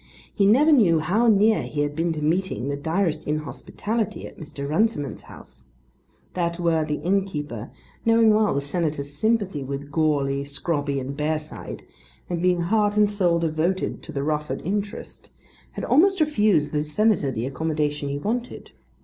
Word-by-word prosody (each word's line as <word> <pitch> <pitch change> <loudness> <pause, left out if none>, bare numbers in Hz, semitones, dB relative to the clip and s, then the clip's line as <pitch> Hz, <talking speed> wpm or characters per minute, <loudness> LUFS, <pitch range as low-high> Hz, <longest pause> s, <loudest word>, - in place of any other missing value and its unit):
He 200 -2 +3
never 280 +9 +5
knew 205 - +5
how 195 +9 +1
near 215 0 +4
he 145 - -3
had 145 0 -1
been 165 +2 0
to 150 -1 -4
meeting 165 -4 0
the 140 - -1
direst 165 +4 -1
inhospitality 180 +8 -3
at - - -11
Mr. 145 -3 -7
Runciman's 155 - 0
house. - - -14 0.7
That 170 -1 -2
worthy 160 -3 +1
innkeeper, 150 - -2 0.3
knowing 225 -1 +5
well 215 -5 +2
the 140 - +1
Senator's 145 -1 -2
sympathy 200 -4 0
with 140 +2 -6
Goarly, 140 -3 +1
Scrobby 140 0 -2
and 135 +1 -5
Bearside, 155 +1 -4 0.5
and 170 -1 -1
being 180 -1 +2
heart 205 +3 +1
and 210 -1 +5
soul 185 -5 +1
devoted 165 +3 -1
to - - -9
the 140 -2 -3
Rufford 150 0 -2
interest, 200 +3 -4 0.4
had - - -5
almost 380 +4 +4
refused 210 - +2
the 150 - 0
Senator 190 0 +1
the 120 -2 -3
accommodation 150 0 -2
he 140 - -2
wanted. 235 +10 -4
165 Hz, 155 wpm, -24 LUFS, 145-205 Hz, 0.7 s, never